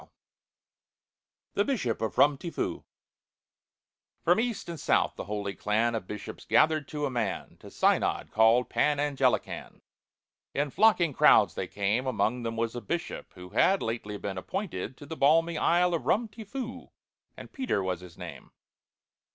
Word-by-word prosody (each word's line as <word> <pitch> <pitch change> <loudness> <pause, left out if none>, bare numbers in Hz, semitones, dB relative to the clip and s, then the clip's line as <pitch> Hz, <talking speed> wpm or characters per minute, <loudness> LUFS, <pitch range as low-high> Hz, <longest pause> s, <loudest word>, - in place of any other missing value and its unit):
'" - - -63
THE 205 - +2
BISHOP 205 - -1
OF 110 - -2
RUM 145 0 +5
TI 170 - -5
FOO - - -3 1.4
FROM 175 +5 +4
east 235 -2 -2
and 170 -2 -6
south - - +2
the - - -6
holy 100 0 -3
clan 110 +4 0
Of 110 -5 -4
Bishops 105 -1 -7
gathered 155 -2 +3
to 150 -1 -3
a 135 - -2
man; 120 -2 -3
To - - -12
Synod, - - +1
called 115 +3 +4
Pan 150 -1 +1
Anglican, 135 -4 -1 0.7
In 145 0 0
flocking 185 -5 +4
crowds - - +5
they - - -4
came. 105 +6 -1
Among 125 -1 0
them 115 -1 -4
was 115 0 -1
a 120 - -4
Bishop, 170 - -4
who 90 0 -10
Had 190 - +3
lately 110 -2 -3
been 100 -2 -4
appointed 130 - -4
to 145 - -11
The 160 - -6
balmy 160 +3 +3
isle 175 +1 +3
of 145 -6 -2
Rum 230 +3 +2
ti 220 +1 -11
Foo, 250 +3 -6 0.5
And - - -11
PETER 255 - -1
was 90 -2 -2
his 90 -2 -13
name. 85 -7 -9
135 Hz, 165 wpm, -28 LUFS, 110-170 Hz, 1.4 s, RUM